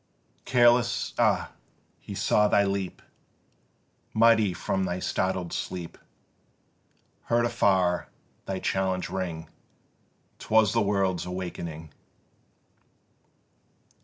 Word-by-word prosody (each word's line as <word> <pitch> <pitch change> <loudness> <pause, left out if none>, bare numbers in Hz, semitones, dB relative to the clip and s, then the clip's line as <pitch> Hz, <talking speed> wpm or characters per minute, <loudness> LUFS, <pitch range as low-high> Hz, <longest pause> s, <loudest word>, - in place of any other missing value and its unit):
Careless, 120 -1 +3
ah! - - +2 0.5
he - - -9
saw 105 0 +3
thee 100 -1 +3
leap 100 -1 -3 1.1
Mighty 110 -3 +5
from 95 +2 -2
thy 90 -1 -2
startled 95 -1 -2
sleep, 90 -3 -5 1.3
Heard 120 0 +2
afar 95 -6 +1 0.4
thy 95 - -2
challenge 95 -2 -1
ring: 85 -4 -4 0.9
'Twas 110 -1 +3
the 115 - +2
world's 95 -4 0
awakening. 85 -4 -6
95 Hz, 85 wpm, -27 LUFS, 90-105 Hz, 1.3 s, Mighty